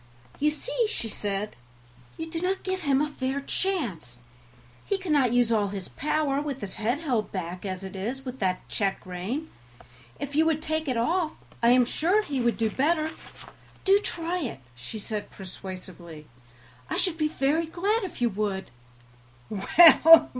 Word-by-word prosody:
"You 300 - +4
see," 465 +9 -1
she 230 - -3
said, 205 0 -3 0.6
"you 325 - -4
do 330 0 -4
not 375 +2 -1
give 375 0 -2
him 280 -3 +2
a 300 - +2
fair 270 -1 -2
chance; 260 - -2 0.7
he 400 - 0
cannot 300 -10 +2
use 245 -1 +3
all 210 -3 +3
his 195 -2 -6
power 295 -1 0
with 280 -3 -4
his 195 -2 -3
head 240 +8 0
held 245 -9 0
back 180 +1 -4
as 185 0 -4
it 190 0 -7
is 240 +8 -4
with 255 0 -6
that 185 -2 -1
check 195 -2 -1
rein; 195 - -4 0.7
if 285 0 -4
you 315 - +5
would 315 -2 +2
take 315 0 -2
it 255 -3 0
off 320 +6 +1 0.3
I 235 - +5
am 250 0 +6
sure 360 - +2
he 280 -8 -2
would 235 -1 +1
do 225 -1 +1
better 310 +4 +1 0.7
do 395 +1 +6
try 345 -2 -2
it," 235 - -4
she 125 - -8
said 210 0 -4
persuasively, 185 -4 -9 0.6
"I - - -1
should 335 -3 0
be 310 - +3
very 305 +2 +1
glad 400 +7 0
if 355 -9 -4
you 240 - +4
would." 195 -5 -2
265 Hz, 170 wpm, -27 LUFS, 205-320 Hz, 0.7 s, am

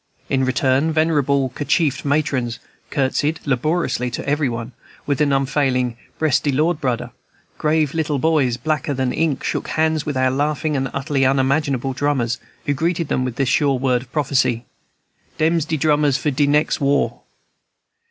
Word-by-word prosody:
In 130 -1 +1
return, 130 +3 +2
venerable, 145 -4 +2
kerchiefed 145 +1 0
matrons 140 -5 0 0.3
courtesied 145 +3 0
laboriously 140 -1 0
to 120 - -6
every 145 -1 +1
one, 115 +1 -5 0.3
with 145 0 0
an 145 -1 +3
unfailing 135 -3 +1 0.2
"Bress 155 -4 +2
de 145 - -1
Lord, 155 +4 +1
budder." 125 -5 -2 0.5
Grave 155 -1 +1
little 155 -3 0
boys, 135 -4 +2
blacker 150 +2 -1
than 130 -1 -1
ink, 155 -4 0
shook - - -2
hands 160 -1 +1
with 150 -3 -3
our 130 0 +2
laughing 150 +2 0
and 135 -1 -1
utterly 140 0 -1
unmanageable 135 0 +1
drummers, 125 -4 0 0.3
who 145 - +1
greeted 165 +2 -1
them 130 - 0
with 125 -2 -3
this 135 -1 0
sure 140 -2 +2
word 125 -1 +1
of 125 0 -15
prophecy, 130 -5 +1 0.7
"Dem's 160 0 +2
de 160 -1 -1
drummers 145 -2 +2
for 150 +3 -1
de 140 +2 +1
nex' 150 +1 +2
war!" 140 0 +1
140 Hz, 160 wpm, -20 LUFS, 130-155 Hz, 0.7 s, an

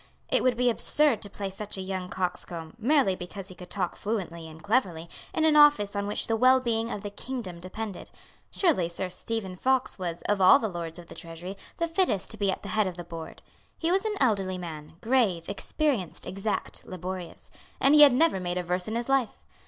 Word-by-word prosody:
It - - +2
would 250 -2 +2
be 250 0 +3
absurd 285 0 +3
to 205 - -4
place 195 -1 -5
such 210 0 -5
a - - -3
young 185 -1 -4
coxcomb, 175 -3 -4
merely 255 -5 +3
because 185 +2 -8
he - - -8
could 180 0 -11
talk 185 -3 -2
fluently 175 -6 -4
and 160 0 -12
cleverly, 190 -8 0 0.2
in 320 - +1
an 310 -1 +4
office 290 -10 +6
on 200 0 -1
which 205 - 0
the 225 - +1
wellbeing 235 -2 +3
of 205 - -5
the 205 - -5
kingdom 205 -6 -6
depended. 190 +2 -6 0.4
Surely 290 - +2
Sir 180 +2 -4
Stephen 195 0 -3
Fox 260 +3 +1
was, 175 -2 -4
of 205 -2 0
all 185 - +8
the 220 - -2
Lords 170 -3 -5
of 175 - -10
the - - -12
Treasury, 170 +3 -8 0.2
the 335 - 0
fittest 330 - +1
to 220 - -4
be 200 -2 +1
at 190 - -2
the 200 - -6
head 215 -2 +2
of 180 -1 -5
the 175 - -5
Board. 165 -1 -9 0.3
He 330 +1 0
was 385 +1 +2
an 435 -1 -1
elderly 195 -7 +1
man, 160 -4 -8
grave, 220 -9 +2
experienced, 210 - -1
exact, 195 +3 -3
laborious; 185 -1 -6 0.3
and 275 - +5
he 300 - +8
had 290 -2 +10
never 270 -4 +3
made 180 0 -2
a 180 - -1
verse 180 +2 -2
in 220 - -3
his 235 0 -2
life. 270 -5 0
200 Hz, 215 wpm, -27 LUFS, 180-245 Hz, 0.4 s, had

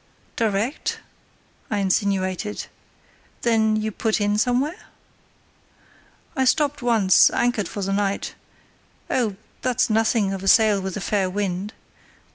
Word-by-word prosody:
"Direct?" 225 +4 -1 0.7
I 210 - -1
insinuated. 195 0 -1 0.8
"Then 220 -2 +3
you 215 0 -1
put 220 +1 -1
in 205 0 +1
somewhere?" 255 +8 0 1.5
"I 265 - +1
stopped 285 +2 +1
once, 225 -6 +5
anchored 240 -6 0
for 200 - -5
the 195 +1 -1
night; 200 0 -1 0.8
oh, 225 -6 0 0.3
that's 255 -2 +1
nothing 220 -2 +2
of 190 - -5
a 195 - -5
sail 210 -1 +5
with 190 0 -4
a - - -5
fair 195 -1 0
wind. 195 +1 -3
210 Hz, 120 wpm, -23 LUFS, 195-235 Hz, 1.5 s, once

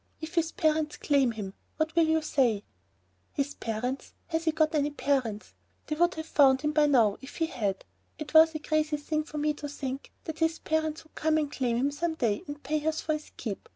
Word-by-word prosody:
"If 320 +2 -7
his 335 -1 +1
parents 310 -2 +1
claim 275 -5 +2
him, 200 -3 -6 0.2
what 315 +1 -1
will 335 -1 +5
you 320 0 +2
say?" 245 -9 +2 0.7
"His 285 0 -1
parents! 245 +4 -4
Has 325 0 -1
he 320 - +4
got 315 0 +2
any 295 -1 +2
parents? 265 -7 -1 0.3
They 305 - -2
would 345 +3 +2
have 315 0 -5
found 270 -4 +5
him 300 - +1
by 300 -1 +4
now 230 -8 +4
if 270 - -10
he 330 - +1
had. 205 - -2 0.3
It 305 0 -7
was 320 0 +7
a - - -1
crazy 305 0 0
thing 305 +1 -1
for 305 - -7
me 300 0 +1
to 295 0 -6
think 270 -1 -5
that 315 -1 -6
his 325 0 +2
parents 315 0 -1
would 315 - -25
come 315 0 +1
and 295 -2 0
claim 245 -5 0
him 275 +4 +1
some 320 +3 -2
day 225 -8 0
and 290 0 -7
pay 300 +2 -1
us 315 0 +1
for 310 - 0
his 305 0 -5
keep. 210 -5 -5
300 Hz, 220 wpm, -29 LUFS, 265-315 Hz, 0.7 s, was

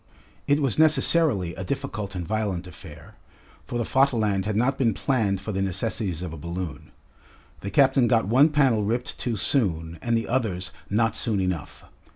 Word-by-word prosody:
It 145 +1 +2
was 135 +2 0
necessarily 150 - +3
a 95 - -6
difficult 105 -4 -4
and 90 -2 -4
violent 105 -5 -2
affair, 90 - -12 0.5
for 120 - -3
the 120 - 0
Vaterland 110 -8 +1
had 110 - -1
not 125 +5 +2
been 115 -6 +1
planned 110 -8 0
for 105 - -5
the 95 -1 -2
necessities 95 -2 -2
of 90 -3 -5
a - - -7
balloon. 85 0 -6 0.7
The 100 - -5
captain 135 +3 +4
got 115 -4 +2
one 135 +8 +5
panel 135 -8 +2
ripped 120 +4 -2
too 120 -3 -2
soon 85 - -1
and 120 -1 +1
the 115 - -3
others 110 -8 -1 0.2
not 110 +1 +1
soon 110 -4 0
enough. 90 -4 -3
110 Hz, 175 wpm, -25 LUFS, 95-130 Hz, 0.7 s, one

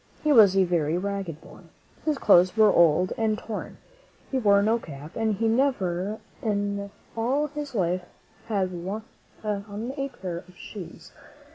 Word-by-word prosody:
He 305 - +3
was 205 -6 +7
a 190 - +6
very 170 -3 +1
ragged 195 -4 -4
boy. - - -14 0.4
His 305 -2 +1
clothes 185 -4 +5
were 215 -2 +6
old 170 +2 +4
and 220 -1 +1
torn; 220 -1 -6 0.5
he 265 - +1
wore 200 -3 +4
no 225 +3 +2
cap, 150 -4 -10
and 220 -2 0
he 225 +4 -1
had 225 - +3
never 205 -7 0 0.2
in 200 -2 -1 0.3
all 255 +6 +1
his 295 -2 -6
life 180 -2 +1 0.5
had 200 -4 0 0.7
on 210 +3 -4
a 275 -1 -2
pair 180 -8 -5
of 180 - -18
shoes. 195 -5 -10
205 Hz, 155 wpm, -26 LUFS, 185-225 Hz, 0.7 s, was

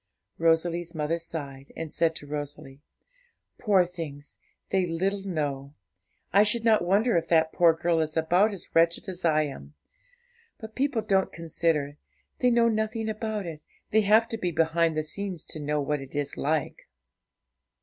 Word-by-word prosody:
Rosalie's 165 +1 +1
mother 155 +2 -1
sighed, 140 -5 -6
and 165 -2 -5
said 165 -1 +2
to 145 - -8
Rosalie, 145 -1 -7 0.8
'Poor 195 -5 +4
things! 155 -5 -9 0.3
they 190 -2 +2
little 190 +4 -1
know; 145 -6 -3 0.6
I 200 - +7
should 215 +2 +2
not 220 -5 +4
wonder 200 +6 +2
if 165 0 -1
that 160 -1 +3
poor 170 -2 +5
girl 165 0 +1
is 155 0 -2
about 175 +7 +3
as 200 - -7
wretched 165 +4 +2
as 185 -1 -6
I 155 -2 +3
am. 75 - -8 0.8
But 220 -1 -9
people 260 -4 0
don't 195 -2 +1
consider; 160 -3 -1 0.4
they 250 - +4
know 235 -1 +4
nothing 220 0 -1
about 215 -2 -3
it; 160 -3 -7 0.3
they 220 - +4
have 215 +3 +4
to 225 - -4
be 180 - -1
behind 165 0 +1
the 155 - +1
scenes 185 +1 -5
to 155 - -7
know 150 0 -1
what 145 0 -1
it 135 +1 -11
is 145 -1 -2
like.' 155 0 -2
165 Hz, 165 wpm, -27 LUFS, 150-200 Hz, 0.8 s, I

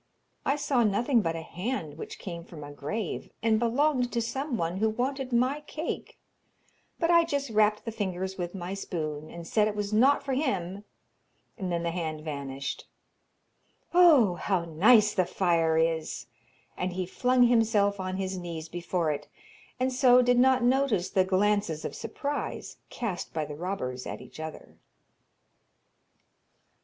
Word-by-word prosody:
'I 275 - +3
saw 280 -4 +1
nothing 230 +4 +2
but 165 -3 -1
a 165 - -5
hand 180 - -4
which 160 - -8
came 170 -3 -7
from 160 -3 -10
a 145 - -8
grave, 160 +8 -4
and 220 -1 +3
belonged 250 +2 +1
to 235 - +1
someone 235 - -2
who 220 +2 +2
wanted 260 +4 -2
my 255 +5 +1
cake, 315 +2 -5 0.8
but 335 0 +2
I 340 0 +6
just 280 -6 -2
rapped 210 0 +2
the 225 - -3
fingers 190 -3 -3
with 175 0 -5
my 180 0 -5
spoon, 155 -6 -4
and 170 -1 -9
said 215 +3 +3
it 210 - -3
was 205 0 -3
not 265 +6 +4
for 275 - -2
him, 200 - -2 0.7
and 190 -5 -4
then 170 -1 -1
the 170 - -1
hand 160 -3 -3
vanished. 140 -3 -5 1.1
Oh, 310 - +6
how 175 -1 -1
nice 210 +7 +5
the 185 - +3
fire 170 -3 +1
is!' 160 -1 0 0.5
And 180 0 -2
he 185 0 -2
flung 250 +7 +2
himself 220 -4 +3
on 185 0 -3
his 190 -1 -3
knees 165 -2 -6
before 175 -1 -1
it, 145 0 -5 0.5
and 255 0 +1
so 250 -1 +6
did 245 0 +3
not 260 -1 +4
notice 245 -7 +2
the 190 -2 +4
glances 190 -3 +1
of - - -4
surprise 285 +6 -4
cast 210 -7 -4
by 155 -1 0
the 150 - -7
robbers 145 -8 -4
at - - -5
each - - -13
other. 160 0 -8
200 Hz, 160 wpm, -28 LUFS, 170-245 Hz, 1.1 s, I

